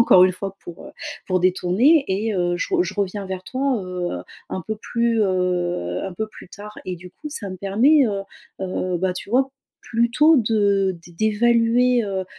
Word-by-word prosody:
encore 185 -5 +7
une 185 - +3
fois, 195 +1 -6
pour, 175 - -10
heu, - - -10 0.4
pour 185 -1 +1
détourner 190 - +3
et: 210 +4 0
«Heu, 175 -1 0
je 180 - -2
re 355 - +4
je - - -5
reviens 200 0 -2
vers 190 -1 -5
toi, 260 -3 -1
heu, 180 -1 -3 0.4
un 185 - -4
peu 220 - -3
plus, 235 +1 0
heu, 180 - 0
un 190 - -5
peu 220 +3 -3
plus 215 - -13
tard» 210 +3 -10
et 185 -1 -3
du 180 +1 -12
coup, 300 - -9
ça 225 -10 -6
me 185 - -6
permet, 240 - +4
heu, 200 -2 -2 0.4
heu, 185 -1 -2
bah, 185 +1 0
tu 185 - -7
vois, 265 +3 +2 0.4
plutôt, 240 +8 +4
de 200 -4 +2
d 175 - -14
d'évaluer, 235 +5 +3
heu, 190 -2 -3
200 Hz, 195 wpm, -22 LUFS, 185-235 Hz, 0.4 s, encore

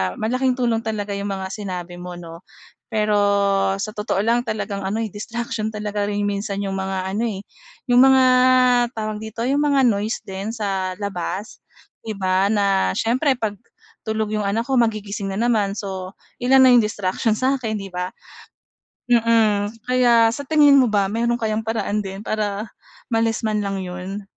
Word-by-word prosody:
malaking 255 +3 0
tulong 240 -3 +1
talaga 215 -2 -4
'yong 200 0 -3
mga 190 -1 -4
sinabi 180 -4 -6
mo, 180 0 -7
'no? 170 0 -11 0.4
Pero 215 -2 +1 0.6
sa 215 +2 -4
totoo 210 -2 -2
lang 240 +2 +1
talagang 205 -2 -3
ano, 220 +3 -1
eh, 215 - -5
distraction 220 0 -4
talaga 210 -1 -2
rin 205 0 -1
minsan 200 0 -2
yung 195 -1 -3
mga 190 0 -3
ano, 225 +4 -1
eh, 200 -3 -5 0.5
yung 245 - +6
mga 265 0 +6 0.7
tawag 215 -1 -3
dito 220 +1 -6
yung 275 +4 +1
mga 280 -2 +3
noise 220 -1 0
din 200 +2 -5
sa 195 -4 -2
labas, 200 +1 -5 0.5
'di 215 - -3
ba, 190 0 +1
na 200 - +1
siyempre 260 +5 +1
'pag 215 -5 -4 0.5
tulog 220 -1 -1
'yong 210 -1 -1
anak 225 +5 -1
ko 265 - +2
magigising 210 -4 -1
na 195 - -4
naman. 205 -4 +1
So, 190 -2 -6 0.2
ilan 260 +2 +4
na 260 - +7
yung - - +7
distraction 210 +2 -1
sa 260 +5 +1
'kin, 225 -4 -3
'di 195 -1 -7
ba? 180 0 -4 1.0
Mm, 225 -3 +3 0.2
kaya 240 -3 +4
sa 285 +4 -6
tingin 290 -2 +6
mo 255 - +4
ba 200 -2 +1
meron 235 +1 +1
kayang 220 -2 -2
paraan 220 -2 -1
din 195 0 -6
para 210 0 -3 0.4
ma-less 225 0 +1
man 215 -1 0
lang 195 -2 -3
'yon? 185 +3 -6
210 Hz, 170 wpm, -21 LUFS, 195-230 Hz, 1.0 s, na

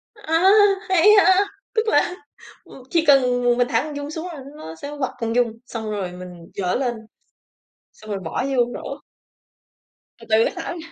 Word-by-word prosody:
A! 345 -1 +2 0.4
Hay 370 +1 +4 0.2
ha, 380 +2 +5 0.3
tức 445 -1 0
là, 360 - +2 0.5
ờ, 265 - -14
chỉ 330 -1 +1
cần 250 -3 +4
m 240 0 +3
mình 245 0 +2
thả - - +1
con 300 -1 -7
giun 285 +1 -5
xuống 320 +3 -5
là 310 -6 -8 0.2
nó 160 - -9
sẽ 285 - -8
quặp 260 - -1
con 230 -1 -2
giun, 230 -2 0
xong 220 -3 -5
rồi 195 -4 -3
mình 180 -1 -11
giở 180 -2 -1
lên, 245 -2 -1 1.0
xong 215 0 -13
rồi 200 - -2
bỏ 170 +8 -3
vô 260 -3 +2
rổ. 275 +1 -7 1.2
Từ 230 - -14
từ 220 +1 +4
cái - - -2
thả 335 0 -5
ra. - - -8
250 Hz, 190 wpm, -22 LUFS, 220-320 Hz, 1.2 s, ha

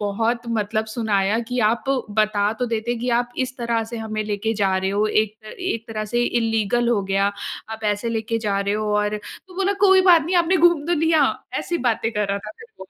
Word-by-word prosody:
बहुत 225 +4 -1 0.2
मतलब 215 +1 -1
सुनाया 210 -2 +1
कि 250 - -1
"आप 235 - -2 0.3
बता 210 -1 +2
तो 250 - +1
देते 230 +1 -1
कि 245 +1 -2
आप 245 0 -6
इस 255 - -11
तरह 235 -1 0
से 235 +1 -7
हमें 215 -1 -3
लेके 215 +2 -2
जा 195 -3 +1
रहे 190 0 -1
हो। 205 +2 +1
एक 215 0 0
एक 235 -12 -3
तरह 215 -1 -3
से 240 - +3
इल्लीगल 230 0 +1
हो 225 -4 +2
गया। 195 +1 +1 0.4
आप 220 0 -7
ऐसे 210 +2 0
लेके 225 0 -1
जा 200 0 +1
रहे 200 +1 0
हो 210 -1 -1
और" 210 0 0 0.3
तो 365 - -14
बोला 390 +1 +1
"कोई 380 0 +6
बात 330 -3 +7
नहीं 355 +4 0
आपने 345 +2 +3
घूम 335 -3 +3
तो 345 - +2
लिया।" 320 -2 +4 0.3
ऐसी 345 - -2
बातें 225 0 0
कर 210 -1 -1
रहा 200 0 0
था 210 +1 -9
फिर 450 - -12
वो। 190 - -8
220 Hz, 225 wpm, -22 LUFS, 210-240 Hz, 0.4 s, बात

